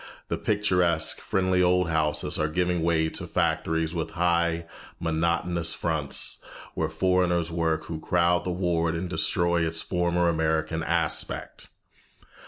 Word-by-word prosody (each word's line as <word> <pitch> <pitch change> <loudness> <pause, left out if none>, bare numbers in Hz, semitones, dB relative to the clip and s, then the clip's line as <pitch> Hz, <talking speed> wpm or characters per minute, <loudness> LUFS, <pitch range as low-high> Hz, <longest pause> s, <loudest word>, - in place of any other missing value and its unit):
The - - -1
picturesque, 90 -6 +1
friendly 95 -1 +1
old 90 0 +3
houses 80 -2 0
are 75 - +2
giving 90 +2 0
way 80 -1 +2
to - - -6
factories 80 0 0
with 80 -2 -2
high, 85 -1 +1 0.3
monotonous 85 +1 0
fronts, 80 -4 -1 0.3
where - - -1
foreigners 90 -2 +1
work 80 -1 0
who 80 -1 -5
crowd 85 +1 +2
the 90 - -3
ward 85 -2 0
and 90 +3 -3
destroy 85 0 +1
its 80 0 -2
former 90 -1 +1
American 80 0 0
aspect. - - -1
85 Hz, 130 wpm, -26 LUFS, 80-90 Hz, 0.3 s, old